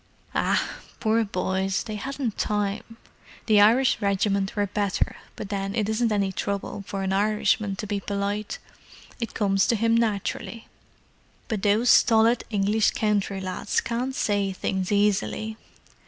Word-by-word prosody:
"Ah, - - 0 0.2
poor 225 0 +2
boys, 190 0 -1
they 215 - -6
hadn't 260 +1 -3
time! 210 +2 -2 0.5
The 215 -2 +5
Irish 235 +4 +4
regiments 200 0 0
were 205 -1 +1
better, 200 0 -1 0.2
but 205 - -7
then 195 0 -3
it 215 -3 0
isn't 220 +1 +1
any 200 -2 +1
trouble 200 +1 -4
for 195 -1 -3
an 190 0 -1
Irishman 210 0 +1
to 210 - -5
be 205 -1 -2
polite; 200 +1 -3 0.6
it 230 -2 -4
comes 195 -2 +2
to 235 - +3
him 230 +1 +2
naturally. 230 0 -2 0.8
But 215 -3 -2
those 215 +4 +3
stolid 225 +1 +5
English 210 +1 +2
country 205 -2 0
lads 185 -1 -1
can't 250 +3 -3
say 205 -4 0
things 190 +1 -2
easily." 210 +2 +1
205 Hz, 140 wpm, -25 LUFS, 195-220 Hz, 0.8 s, The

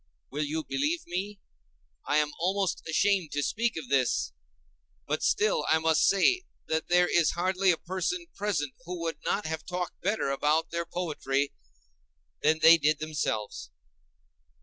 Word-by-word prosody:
Will 145 +3 -1
you 155 +2 -3
believe 300 - -1
me? 195 +4 -4 0.7
I 145 - +2
am 150 -1 +2
almost 190 +1 0
ashamed 190 -1 +2
to 145 0 0
speak 230 +5 -1
of 155 -5 -6
this, 130 - +1 0.7
but - - -2
still 210 -7 +2
I 160 - +5
must 160 0 +3
say 280 - +4 0.2
that 160 0 -1
there 180 0 +4
is 170 -3 +3
hardly 185 +2 +1
a 170 - +4
person 190 - -3
present 165 -10 -2
who 180 +1 -5
would 165 -1 -3
not 205 - -1
have 160 -1 -3
talked 180 -1 -5
better 195 -6 0
about 150 +3 +1
their 170 0 -3
poetry 145 -5 -2 0.9
than 155 +1 +3
they 165 +1 +9
did 155 +1 +2
themselves. 110 - -3
170 Hz, 150 wpm, -28 LUFS, 150-190 Hz, 0.9 s, they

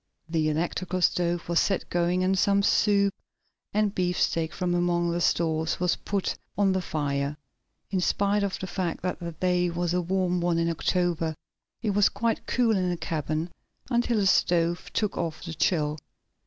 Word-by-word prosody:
The 160 -2 +1
electrical 175 +3 -2
stove 175 -1 +1
was 170 -1 +2
set 195 - 0
going, 175 +1 +1
and 190 +1 +2
some 200 +1 +3
soup 200 -1 +3 0.6
and 210 -1 +1
beefsteak 175 -3 0
from 180 -1 -1
among 175 -1 +1
the 170 +1 -1
stores, 160 -2 +1
was 180 0 +2
put 200 -2 -2 0.2
on 200 -1 +3
the 190 0 0
fire. 145 -3 -2 0.5
In 190 -2 +1
spite 200 +3 +1
of 200 -1 -1
the - - -5
fact 180 -3 -3
that 180 - -2
the 170 -1 -5
day 180 +1 +1
was 175 0 -1
a 180 - +1
warm 180 0 0
one 170 -1 +1
in 170 0 +1
October, 165 -1 0 0.5
it 215 - +1
was 205 0 +4
quite 225 +2 -2
cool 235 -3 +2
in 185 -2 +1
the 175 - -1
cabin, 160 0 -2 0.4
until 240 -1 +2
the 205 - +2
stove 175 -2 +2
took 210 -2 -1
off 160 -2 -3
the 165 - -5
chill. 155 -3 0
175 Hz, 175 wpm, -27 LUFS, 170-190 Hz, 0.6 s, was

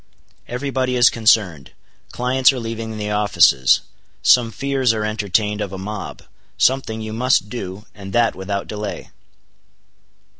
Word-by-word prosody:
Every 130 +3 -4
body 130 -1 -1
is 120 -2 +5
concerned; 105 -10 +1 0.4
clients 130 +2 +3
are 130 - -5
leaving 115 -1 -5
the 105 0 -4
offices; 85 -11 +3 0.4
some 120 -2 +5
fears 135 0 0
are 110 -1 -2
entertained 105 0 -1
of 100 -2 -4
a 95 - -6
mob; 100 +1 -7 0.3
something 125 -4 +1
you 110 0 -6
must 120 -3 +1
do, 105 -3 -7
and 100 -2 -10
that 120 +2 +2
without 95 +1 -4
delay." 105 -1 -6
110 Hz, 140 wpm, -20 LUFS, 100-125 Hz, 0.4 s, is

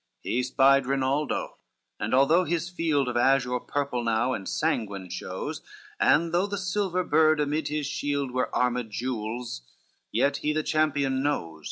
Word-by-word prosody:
CXIII - - -3
He 125 - +2
spied 135 +1 +4
Rinaldo, 135 +2 -1 0.4
and 110 - 0
although 155 +7 +5
his 175 0 -2
field 155 -6 0
Of 125 - -3
azure 125 0 +2
purple 140 -2 -2
now 115 +3 +1
and 95 - -4
sanguine 100 - -2
shows, 120 +12 -5 0.4
And 165 - +3
though 180 +3 +2
the 200 0 -3
silver 185 -1 -1
bird 155 -2 +3
amid 150 +2 0
his 150 -1 -2
shield 140 -1 -2
Were 125 0 -1
armed 125 -2 0
gules; 115 - -4 0.5
yet 140 0 +2
he 150 - -1
the 155 0 0
champion 145 -4 +1
knows. 85 - -2
140 Hz, 160 wpm, -27 LUFS, 125-155 Hz, 0.5 s, although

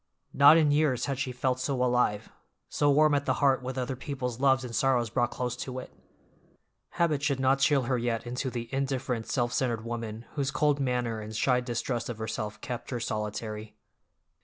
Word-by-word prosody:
Not 145 +3 +8
in 155 -3 +4
years 145 -4 +2
had 140 -2 -3
she 135 -2 -2
felt 125 0 -1
so 135 +2 -1
alive, 125 -4 +1 0.4
so 145 - +1
warm 150 +1 +5
at 145 0 0
the 130 - +2
heart 135 -2 +3
with 130 +1 -5
other 130 +1 -2
people's 125 -3 -4
loves 135 -1 +3
and 115 -2 -6
sorrows 125 -4 +2
brought 120 0 +1
close 125 -1 -3
to 130 0 -5
it. 130 - -8 1.0
Habit 160 -5 +2
should 140 -2 0
not 135 +1 +3
chill 135 -1 +3
her 125 0 0
yet 115 -1 -2
into 125 +2 -3
the 120 -1 -5
indifferent 135 -3 -2
self 120 -2 0
centered 120 -4 -1
woman 115 -1 -5
whose 140 -2 -1
cold 145 0 +1
manner 125 -4 -1
and 110 +1 -7
shy 125 +3 +2
distrust 120 -1 -3
of 120 - -4
herself 110 -1 -4
kept 125 -2 -5
her 125 - -3
solitary. 105 0 -4
125 Hz, 190 wpm, -28 LUFS, 120-135 Hz, 1.0 s, Not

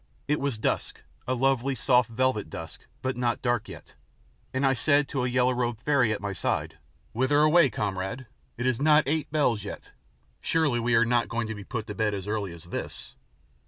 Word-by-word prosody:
It 150 +1 +1
was 140 -5 -1
dusk, 110 - -2 0.2
a 130 - +1
lovely 135 +1 +1
soft 125 -3 +3
velvet 120 -5 0
dusk, 80 0 -9 0.2
but 130 0 -1
not 120 -1 -1
dark 120 -3 0
yet, - - -11 0.6
and 130 +1 0
I 135 - +4
said 145 +4 +3
to 135 -3 -1
a 125 - 0
yellow 125 0 +2
robed 120 -2 -1
fairy 140 -6 +3
at 110 - -1
my 100 0 -3
side: 80 -3 -2 0.3
"Whither 130 +5 +2
away, 155 0 +5
comrade? 100 +3 -3 0.3
It 120 - -3
is 130 0 +1
not 150 0 +5
eight 150 +2 -1
bells 125 -9 +1
yet. 100 - -8 0.5
Surely 150 -7 +1
we 120 +1 +2
are 115 +1 +5
not 120 0 +1
going 115 0 -1
to - - -2
be 105 -2 -8
put 110 0 -4
to 105 - -6
bed 105 -1 0
so 105 - -4
early 105 -4 -2
as 85 -1 -11
this?" 85 - -6
120 Hz, 200 wpm, -27 LUFS, 110-135 Hz, 0.6 s, away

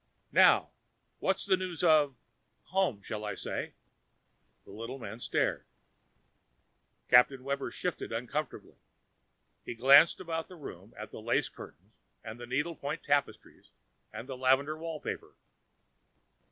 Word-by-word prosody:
Now, - - +5 0.5
what - - 0
news 185 -3 0
of 150 -5 +4 0.5
home, 185 - 0
shall 105 +1 -5
I 105 - -3
say?" - - -5 0.9
The - - -13
little 115 +6 -7
man 110 -3 -8
stared. - - 0 1.4
Captain 125 +1 +5
Webber 140 +1 -2
shifted 180 -3 -4
uncomfortably. 125 +7 -4 0.9
He 120 - -6
glanced 140 +7 +7
around 165 -3 -4
the 185 - -12
room 150 -5 -10
at - - -8
the - - -9
lace - - +1
curtains, 95 +8 -13 0.3
the 120 +2 -8
needle 150 +7 -1
point 145 +1 -5
tapestries 145 0 -2 0.4
and 125 - -8
the 135 - -5
lavender 135 +4 +2
wallpaper. 160 -1 -6
140 Hz, 120 wpm, -31 LUFS, 120-160 Hz, 1.4 s, glanced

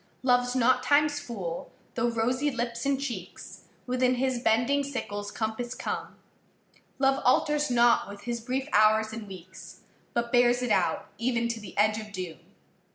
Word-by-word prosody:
Loveâs 245 -1 +2
not 255 0 +3
Timeâs 290 0 +3
fool, 185 -8 -5 0.2
though 240 0 +1
rosy 250 +5 0
lips 235 -1 -3
and 275 -1 +1
cheeks 275 -3 -7 0.2
Within 255 0 +1
his 255 0 0
bending 240 +5 +2
sickleâs 205 -7 -4
compass 235 +2 -3
come; - - -5 0.8
Love 270 0 +2
alters 295 +3 +2
not 240 -3 +4
with 200 0 -9
his 235 -1 -4
brief 260 +4 -2
hours 215 +1 +4
and 220 -2 -7
weeks, 185 -1 -11 0.3
But 235 0 -1
bears 245 0 +4
it 245 - -1
out - - +1
even 235 0 0
to 230 -1 -3
the 210 - -11
edge 215 +1 +3
of 215 -1 -9
doom. 185 -5 -6
240 Hz, 160 wpm, -28 LUFS, 220-255 Hz, 0.8 s, not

